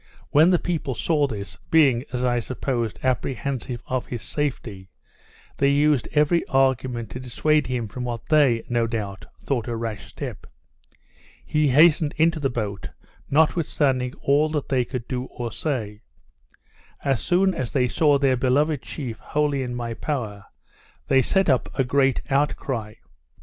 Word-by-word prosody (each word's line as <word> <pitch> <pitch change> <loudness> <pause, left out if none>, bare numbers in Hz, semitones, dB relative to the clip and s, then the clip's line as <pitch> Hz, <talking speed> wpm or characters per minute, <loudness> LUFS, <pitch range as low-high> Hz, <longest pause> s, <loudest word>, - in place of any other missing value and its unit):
When 155 +4 +6
the 180 - +4
people 160 -7 -3
saw 150 +4 +1
this, 100 -5 -7
being, 135 -6 +4
as 125 0 -1
I 120 -1 +2
supposed, 120 -2 -3
apprehensive 130 -1 -2
of 130 -1 -2
his 120 -3 -5
safety, 110 -10 -4 0.7
they 140 - +4
used 145 -2 +3
every 150 +3 +3
argument 130 -4 +1
to 125 - -6
dissuade 150 +5 +1
him 125 -3 -2
from 125 +5 -6
what 120 -2 -4
they, 140 -7 +4
no 120 -1 +1
doubt, 105 -4 -5 0.2
thought 125 -6 -1
a 120 - -2
rash 115 -2 -5
step. - - -7 1.0
He 150 -1 +1
hastened 150 +2 +4
into 160 +1 +3
the 140 -2 0
boat, 105 -5 -4 0.4
notwithstanding 145 -4 +1
all 145 +3 +3
they 140 -4 0
could 120 -2 -5
do 125 -1 -3
or 120 -3 -6
say. 110 -7 -3 1.0
As 135 -4 +1
soon 185 +2 +2
as 130 -7 -3
they 130 -3 +1
saw 145 +2 +3
their 135 -2 +2
beloved 140 +3 +1
chief 125 -6 -6
wholly 145 -2 0
in 125 -1 -4
my 120 -1 -3
power, 110 -7 -4 0.6
they 135 -1 +5
set 190 +8 +1
up 130 -5 +2
a 135 - +3
great 135 +1 +2
outcry. 135 -6 -1
130 Hz, 150 wpm, -24 LUFS, 120-150 Hz, 1.0 s, When